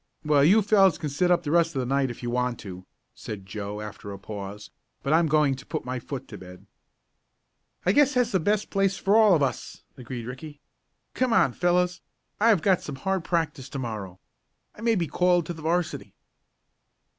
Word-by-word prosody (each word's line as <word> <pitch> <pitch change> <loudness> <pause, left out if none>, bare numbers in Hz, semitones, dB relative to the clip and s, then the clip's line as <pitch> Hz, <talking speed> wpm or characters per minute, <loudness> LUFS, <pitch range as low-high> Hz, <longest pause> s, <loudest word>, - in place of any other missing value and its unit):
"Well, 145 -2 +4
you 205 +8 +5
fellows 195 -3 +4
can 150 - -4
sit 160 +6 0
up 175 -1 +3
the 145 - -3
rest 170 0 +2
of - - 0
the 125 - -1
night 135 +1 +1
if 120 - -9
you 120 - -2
want 125 -1 -1
to," 95 -2 -9 0.3
said 100 -3 -8
Joe, 105 +1 -6
after 105 -1 -8
a 100 - -7
pause; 100 0 -8 0.3
"but 140 - +1
I'm 165 0 +4
going 150 -2 +3
to 135 +1 -8
put - - -5
my 125 0 -3
foot 135 +1 -7
to 105 - -9
bed." 90 0 -13 1.2
"I 180 - +4
guess 285 +3 +4
that's 250 -1 +2
the 190 - +2
best 210 +5 0
place 195 -1 +1
for 200 +2 +2
all 215 -4 +6
of 150 - +2
us," 135 - -4
agreed 125 -2 -7
Ricky. 145 +4 -9 0.5
"Come 255 -2 +1
on, 135 - +3
fellows; 180 +2 +1 0.4
I 225 +3 +4
have 195 -9 +3
got 190 -3 +3
some 145 - -6
hard 190 +6 -2
practice 155 -7 -2
to 140 - -6
morrow. 105 -7 -6 0.5
I - - -14
may 230 -1 +2
be 175 -4 0
called 175 +2 +2
to 175 - -4
the 160 - -11
'varsity." 165 +1 -2
150 Hz, 205 wpm, -26 LUFS, 125-180 Hz, 1.2 s, all